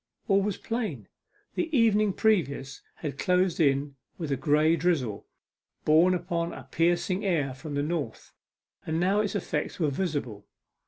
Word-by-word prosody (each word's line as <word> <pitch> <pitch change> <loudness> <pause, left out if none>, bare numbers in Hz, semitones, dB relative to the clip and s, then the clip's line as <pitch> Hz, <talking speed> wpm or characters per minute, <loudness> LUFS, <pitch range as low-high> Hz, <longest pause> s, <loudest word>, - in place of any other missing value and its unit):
All 195 -1 +4
was 200 -1 -1
plain. 210 - -4 0.5
The 335 - -1
evening 215 -3 +4
previous 140 - 0
had 145 -4 -6
closed 180 0 +2
in 140 -2 +1 0.2
with 160 -5 -4
a - - +2
grey 150 +4 +3
drizzle, 145 - -1 0.6
borne 165 +4 +5
upon 170 -1 -2
a - - -8
piercing 175 +3 0
air 155 -9 0
from 145 +3 -7
the 145 - 0
north, 150 -7 -4 0.5
and 160 +1 -1
now 190 +4 +2
its 210 0 -2
effects 160 -5 -2
were 155 -4 +1
visible. 135 - -3
165 Hz, 150 wpm, -28 LUFS, 140-185 Hz, 0.6 s, borne